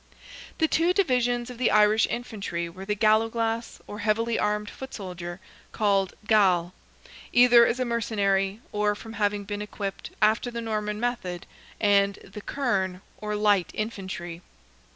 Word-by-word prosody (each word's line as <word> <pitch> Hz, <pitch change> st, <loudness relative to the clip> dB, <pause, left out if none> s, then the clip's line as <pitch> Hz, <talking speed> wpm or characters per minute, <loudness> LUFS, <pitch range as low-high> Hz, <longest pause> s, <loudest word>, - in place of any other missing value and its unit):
The 320 Hz, -, +3 dB
two 335 Hz, +3 st, +2 dB
divisions 250 Hz, -9 st, +1 dB
of 245 Hz, -, -11 dB
the 255 Hz, -, +3 dB
Irish 210 Hz, +1 st, +4 dB
infantry 200 Hz, -8 st, -4 dB
were 185 Hz, +3 st, -9 dB
the 210 Hz, +1 st, -1 dB
galloglass, 225 Hz, +2 st, +1 dB
or 210 Hz, -, -8 dB
heavily 225 Hz, +2 st, +1 dB
armed 210 Hz, 0 st, 0 dB
foot 265 Hz, +5 st, -8 dB
soldier, 180 Hz, -3 st, -7 dB, 0.3 s
called 200 Hz, -3 st, +1 dB
gall, 185 Hz, -5 st, +3 dB, 0.6 s
either 240 Hz, -1 st, +7 dB
as 250 Hz, -, -1 dB
a 255 Hz, -, +1 dB
mercenary, 205 Hz, -3 st, 0 dB
or 210 Hz, 0 st, +1 dB
from 225 Hz, +2 st, -10 dB
having 205 Hz, -1 st, 0 dB
been 205 Hz, +1 st, -5 dB
equipped 205 Hz, -1 st, -5 dB
after 220 Hz, +3 st, +3 dB
the 235 Hz, -1 st, -5 dB
Norman 210 Hz, -2 st, -2 dB
method, 205 Hz, -8 st, -3 dB, 0.3 s
and 200 Hz, -1 st, +3 dB
the 210 Hz, -, -10 dB
kerne, 195 Hz, -9 st, -1 dB, 0.2 s
or 210 Hz, 0 st, -3 dB
light 205 Hz, -3 st, +2 dB
infantry. 190 Hz, -5 st, -5 dB
210 Hz, 145 wpm, -26 LUFS, 195-230 Hz, 0.6 s, either